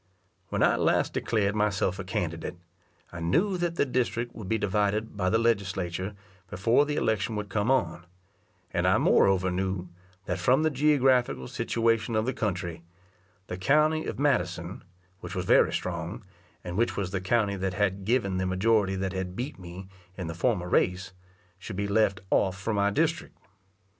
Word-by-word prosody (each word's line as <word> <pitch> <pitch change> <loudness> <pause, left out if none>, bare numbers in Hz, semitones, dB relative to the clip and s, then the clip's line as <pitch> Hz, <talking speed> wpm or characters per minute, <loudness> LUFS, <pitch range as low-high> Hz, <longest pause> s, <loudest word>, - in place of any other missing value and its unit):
When - - 0
I - - +4
last - - +1
declared 100 -3 0
myself 100 -3 0
a - - -3
candidate, 85 -2 -3 0.6
I 85 - -6
knew 165 - +1
that 175 -1 -1
the - - +2
district 120 -2 -1
would 105 -4 -8
be 110 - +2
divided 105 +2 0
by 95 -2 0
the 110 - +3
Legislature 95 -4 -1 0.3
before 115 +10 +2
the 150 - -1
election 110 -3 0
would 105 -1 -4
come 105 +3 0
on; 90 -9 0 0.6
and - - 0
I - - +4
moreover 95 -1 +3
knew, 95 0 -2 0.4
that 90 0 -2
from 130 - +3
the 160 - +2
geographical 130 - +2
situation 115 0 0
of 110 0 +1
the 130 - -1
country, 90 -7 -3 0.6
the 90 - -6
county 155 +9 +2
of - - -4
Madison, 90 - -1 0.4
which - - -7
was - - -2
very - - +5
strong, - - -4 0.4
and 90 +1 -5
which 120 +2 +1
was 95 -3 -2
the 95 -1 -2
county 100 +1 +1
that 95 -1 -2
had 100 -1 0
given 100 -3 +1
the 95 0 0
majority 95 +1 +2
that 95 0 -2
had 95 -1 -4
beat 130 +4 -5
me 90 +1 -9 0.3
in 90 - -4
the 80 - -4
former 90 0 0
race, 90 +1 +1 0.5
should 95 - -7
be 100 +1 -1
left 100 -2 +2
off 95 -1 +2
from 105 +2 -2
my 100 0 +3
district. 160 +9 -1
100 Hz, 175 wpm, -27 LUFS, 95-115 Hz, 0.6 s, very